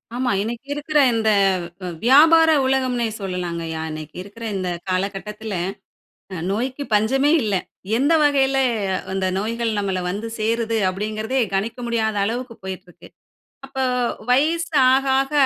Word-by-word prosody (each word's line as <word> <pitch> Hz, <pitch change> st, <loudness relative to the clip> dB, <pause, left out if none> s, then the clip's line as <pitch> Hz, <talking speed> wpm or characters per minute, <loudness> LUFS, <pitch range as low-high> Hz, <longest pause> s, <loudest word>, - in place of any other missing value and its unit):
ஆமா. 250 Hz, 0 st, 0 dB
இன்னக்கி 235 Hz, +5 st, -5 dB
இருக்கிற 295 Hz, +1 st, 0 dB
இந்த 220 Hz, -1 st, +1 dB, 0.5 s
வி -, -, -4 dB, 0.2 s
வியாபார 320 Hz, +6 st, +7 dB, 0.2 s
உலகம்ன்னே 255 Hz, -3 st, +1 dB
சொல்லலாங்கய்யா! 170 Hz, -4 st, -4 dB
இன்னக்கி 155 Hz, 0 st, -8 dB
இருக்கிற 205 Hz, +4 st, -12 dB
இந்த 185 Hz, -2 st, -2 dB, 0.2 s
காலகட்டத்தில 200 Hz, +3 st, -3 dB, 0.8 s
அ -, -, -5 dB
நோய்க்கு 255 Hz, +7 st, -2 dB
பஞ்சமே 265 Hz, +7 st, +3 dB
இல்ல. 210 Hz, -3 st, 0 dB, 0.4 s
எந்த 285 Hz, +5 st, +3 dB
வகையில 275 Hz, -2 st, +3 dB, 0.5 s
இந்த 190 Hz, 0 st, -1 dB
நோய்கள் 230 Hz, +2 st, -1 dB
நம்மள 195 Hz, -2 st, -1 dB
வந்து 210 Hz, +5 st, -4 dB
சேருது 225 Hz, +1 st, 0 dB
அப்பிடிங்கிறதே 215 Hz, +6 st, -2 dB
கணிக்க 220 Hz, +5 st, -2 dB
முடியாத 220 Hz, -2 st, 0 dB
அளவுக்கு 235 Hz, +3 st, -3 dB
போயிட்டு 190 Hz, -1 st, -6 dB
இருக்கு. 175 Hz, -, -16 dB, 0.6 s
அப்போ 265 Hz, 0 st, -4 dB, 0.5 s
வயசு 320 Hz, +6 st, +2 dB, 0.2 s
ஆக, 265 Hz, +1 st, +3 dB, 0.2 s
ஆக 270 Hz, +2 st, -3 dB
230 Hz, 130 wpm, -21 LUFS, 195-265 Hz, 0.8 s, வியாபார